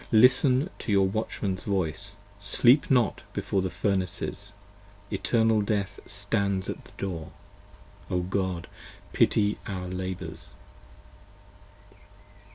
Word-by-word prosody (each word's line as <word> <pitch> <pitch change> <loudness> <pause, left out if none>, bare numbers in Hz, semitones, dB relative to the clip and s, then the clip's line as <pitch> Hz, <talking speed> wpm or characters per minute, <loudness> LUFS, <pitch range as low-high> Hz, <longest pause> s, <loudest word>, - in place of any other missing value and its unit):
Listen 130 - +5
to - - -3
your 100 -1 +5
Watchmans 100 -2 -2
voice: 100 +1 -2 0.2
sleep 125 - +4
not 125 -6 +3
before 95 - 0
the 95 - -1
Furnaces: 95 +1 -2 0.6
65 - - -4
Eternal 110 -2 +3
Death 100 -1 -1
stands 100 -1 0
at - - -9
the - - -17
door. 85 -5 -4 0.8
O 90 - +1
God, 95 -1 -1 0.5
pity 105 -1 +3
our 95 -3 -4
labours. 90 0 -5
100 Hz, 105 wpm, -27 LUFS, 95-110 Hz, 0.8 s, Listen